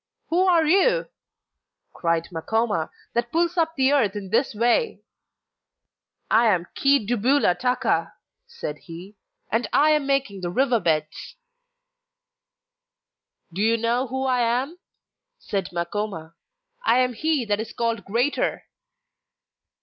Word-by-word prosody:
'Who 360 +3 +2
are 335 -3 +4
you,' 395 +10 +3 0.9
cried 165 -1 -1
Makoma, 205 +1 -1 0.2
'that 235 0 -1
pulls 340 +1 +1
up 325 -2 0
the 265 0 +3
earth 220 -8 +2
in 195 -2 -6
this 245 -1 +1
way?' 240 - +1 1.3
'I 230 +2 +5
am 180 -5 +2
Chi 275 -4 +3
dubula 245 -1 +2
taka,' 250 +5 0 0.3
said 150 - -6
he, 180 +5 -11 0.4
'and 225 +3 0
I 305 +2 +4
am 300 -2 +1
making 275 -9 -1
the 175 - -3
river 245 +4 +2
beds.' 155 - -2 2.2
'Do 190 - -3
you 225 +2 +3
know 235 +3 0
who 265 +2 -3
I 255 -1 +1
am?' 250 +8 -1 0.6
said 200 - -3
Makoma. 170 -1 -4 0.5
'I 375 - +3
am 250 -1 +2
he 295 +1 0
that 205 -1 0
is 220 0 -5
called 230 -3 -2
"greater"! 240 +9 -1
235 Hz, 125 wpm, -24 LUFS, 200-280 Hz, 2.2 s, I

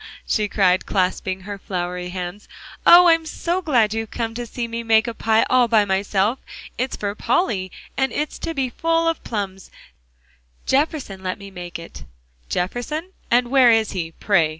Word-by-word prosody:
she 210 -2 0
cried, 185 -3 +2
clasping 185 0 -1
her 200 +1 -7
floury 180 -1 -4
hands, 180 +2 -6 0.4
"oh! 355 +1 +9
I'm 330 -1 +5
so 345 +3 -2
glad 240 - +2
you've 225 -1 -3
come 225 -1 -3
to 240 +1 -5
see 235 +1 -4
me 230 0 -4
make 225 0 +3
a 235 - -3
pie 225 0 +2
all 250 -1 +4
by 220 -3 +4
myself. 200 +4 0 0.4
It's 255 +2 -2
for 205 -1 -3
Polly, 205 - 0 0.2
and 265 0 +1
it's 300 +1 -3
to 330 -1 -4
be 265 -2 0
full 330 +2 +1
of 330 - -1
plums; 195 -4 -5 1.0
Jefferson 275 -9 0
let 185 -1 -3
me 200 -1 -11
make 175 -2 -7
it." 165 0 -11 0.4
"Jefferson? 245 - -3 0.2
And 240 +1 +2
where 265 -3 +6
is 225 -2 +3
he, 165 -3 -4
pray?" 170 -6 +2
220 Hz, 175 wpm, -22 LUFS, 190-260 Hz, 1.0 s, oh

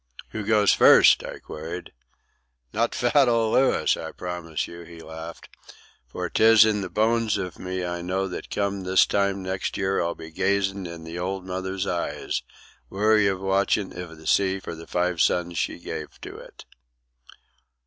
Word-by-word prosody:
"Who 110 - -4
goes 105 -1 +4
first?" - - +7
I - - -7
queried. 80 +3 -8 0.8
"Not 115 +2 0
fat 130 +1 +3
old 115 -2 +2
Louis, 135 - +3
I - - -6
promise 85 -4 -4
you," 85 0 -10
he 85 0 -12
laughed. 80 +1 -9 0.6
"For - - -4
'tis 110 0 +6
in 105 -2 +1
the 95 - -4
bones 110 +2 +1
iv 90 -4 -5
me 90 0 -3
I 85 0 -4
know 95 +2 -1
that 90 - -7
come 100 -1 -1
this 95 0 +4
time 100 -1 0
next 95 0 -3
year 95 0 0
I'll 85 0 -1
be 80 0 -10
gazin' 100 +1 0
in 85 -1 -9
the 80 +2 -7
old 95 +1 -3
mother's 95 +1 -3
eyes, 85 -2 -2 0.5
weary 105 0 +3
with 95 0 -6
watchin' 95 +1 +1
iv 85 -2 -8
the 80 - -15
sea 95 -1 +2
for 90 - -7
the 80 0 -10
five 90 -1 0
sons 85 -1 +1
she - - -2
gave - - -7
to - - -8
it." - - -13
95 Hz, 170 wpm, -25 LUFS, 85-100 Hz, 0.8 s, first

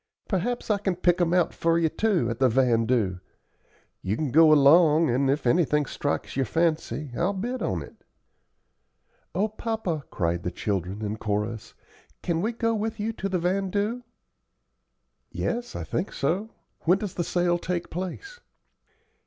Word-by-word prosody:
Perhaps 230 +4 -1
I 205 - +2
can 190 -2 -1
pick 175 0 +2
'em 170 -1 +2
out 180 -1 +2
for 165 0 +1
you, 165 -1 +3
too, 190 - +1
at 115 - -5
the 130 -1 +4
vandoo. 115 -5 +2 0.8
You 95 +3 -1
can 150 -5 -2
go 160 +2 +7
along, 155 +2 +6
and 135 +3 +1
if 140 +1 0
anything 150 +2 +3
strikes 145 +2 -3
your 135 -3 0
fancy 160 -3 -1
I'll 180 +4 +1
bid 240 +7 -3
on - - -1
it." - - -16 1.3
"O 205 +3 +2
papa," 215 -8 -3
cried 85 -2 -1
the 90 - -2
children, 100 +1 -3
in 105 +1 -3
chorus, 105 +1 -3 0.5
"can 170 -1 0
we 220 +5 0
go 230 -1 0
with 220 0 -3
you 220 +2 -2
to 195 -2 -4
the 185 - 0
vandoo?" 195 +6 -1 1.3
"Yes, 240 +1 -3
I - - -4
think 180 - -3
so. 180 +11 -1 0.4
When 180 +3 +5
does 200 -2 -5
the 175 - -2
sale 175 +1 +1
take 175 0 -3
place?" 190 - -6
170 Hz, 160 wpm, -26 LUFS, 135-195 Hz, 1.3 s, go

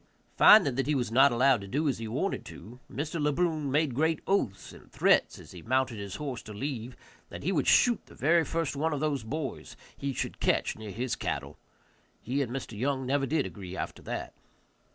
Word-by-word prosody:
Finding 155 - +7
that 135 +1 -1
he 150 - +2
was 120 -4 -1
not 135 +4 +6
allowed 125 -1 +3
to 100 - -8
do 150 +10 0
as 135 - 0
he 115 - -5
wanted 135 - -2
to, 120 +4 -11
Mr. 155 +3 -3
Le 150 0 +2
Brun 155 -2 0
made 145 0 +1
great 160 +4 +1
oaths 105 - -1
and - - -16
threats - - +3
as - - -13
he 90 - -10
mounted 130 0 0
his 100 -1 -6
horse 135 -6 -5
to 105 - -10
leave, 125 0 -5 0.3
that - - -8
he 180 - 0
would 150 -7 0
shoot 240 -3 +4
the - - -15
very 165 +4 +3
first 165 -3 -2
one 155 +3 0
of 145 - -2
those 150 -3 0
boys 135 +3 -5 0.2
he 140 - -3
should 130 - -4
catch - - +1
near 110 -1 -8
his 120 +5 -2
cattle. - - -4 0.6
He 135 +4 -2
and 125 -4 -2
Mr. 125 -4 -5
Young 130 +4 -1
never 135 +1 +1
did 150 +1 +1
agree 95 -2 -8
after - - -5
that. - - -5
135 Hz, 215 wpm, -29 LUFS, 120-150 Hz, 0.6 s, Finding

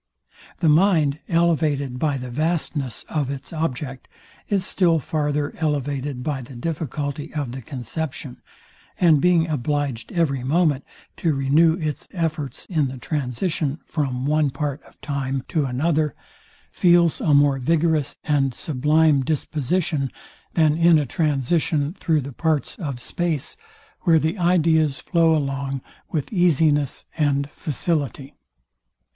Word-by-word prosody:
The 165 - +3
mind, 155 -3 +4
elevated 155 -6 +1
by 145 -2 +1
the 125 -1 -6
vastness 150 - -2
of 145 -4 -1
its 140 +3 -6
object, 135 -4 -3 0.4
is 195 -2 +1
still 170 -4 +2
farther 150 -1 -1
elevated 145 -3 -2
by 140 -2 -2
the 130 +1 -11
difficulty 150 +1 -4
of 145 -5 -2
the 130 +1 -6
conception; 135 +1 -5 0.6
and 160 -5 +5
being 175 -2 +4
obliged 145 -4 -2
every 140 -7 0
moment 150 0 +2 0.3
to 160 -4 +1
renew 150 +5 +4
its 155 -4 -4
efforts 160 -5 -3
in 155 -6 0
the 130 0 -6
transition 145 +2 -2
from 135 -5 -2
one 150 0 +2
part 140 +1 -3
of - - -21
time 135 -2 -2
to 155 -4 +1
another, 150 +3 0 0.6
feels 175 -2 +4
a 150 - +3
more 140 -1 +4
vigorous 160 +1 +1
and 140 -4 +1
sublime 150 +1 +2
disposition, 150 0 -1 0.4
than 155 -3 +4
in 165 0 +5
a 150 - +1
transition 150 +2 0
through 160 -5 0
the 135 +1 -7
parts 160 +1 0
of 140 -8 -4
space, 165 0 -2 0.4
where 165 -2 +4
the 160 +5 0
ideas 160 -4 +3
flow 165 -2 +3
along 135 -1 -2 0.3
with 155 +5 -3
easiness 155 -6 +2
and 140 -1 +1
facility. 145 -3 -2
150 Hz, 130 wpm, -23 LUFS, 135-160 Hz, 0.6 s, and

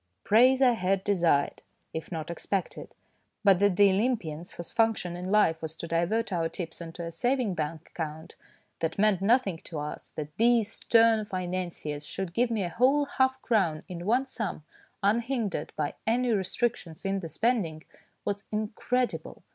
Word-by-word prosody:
Praise 255 +5 +5
I 250 - +6
had 195 -3 0
desired, 170 -8 +2 0.3
if 160 +2 -5
not 160 -1 -4
expected; 185 +2 -4 0.5
but 195 -3 +5
that 200 -2 +3
the 200 +1 +6
Olympians 190 -7 -1
whose 170 - -8
function 225 -6 +1
in 180 +1 -5
life 190 -6 +3
was 160 0 -5
to 170 - -5
divert 185 +7 0
our 165 -2 0
tips 170 -1 -6
into 170 +1 -7
a 165 - -5
savings 245 -1 0
bank 155 0 -4
account 160 -1 -6 0.5
that 165 -1 -2
meant 200 -2 +3
nothing 200 -5 +2
to 165 - -6
us, 150 0 -5
that 150 -1 -7
these 230 -1 +3
stern 225 -1 +4
financiers 180 -6 -4
should 190 -3 -5
give 240 +3 +2
me 220 -4 0
a 175 - -2
whole 270 +5 +4
half 260 -1 +1
crown 185 -10 +1
in 175 0 -6
one 250 +5 +3
sum, 220 - -4 0.4
unhindered 225 - 0
by 150 -2 -1
any 245 +2 +2
restrictions 195 -3 -1
in 195 0 0
the 165 -3 -6
spending, 185 -8 0 0.4
was 200 0 -2
incredible. 220 +4 -2
195 Hz, 165 wpm, -28 LUFS, 165-230 Hz, 0.5 s, I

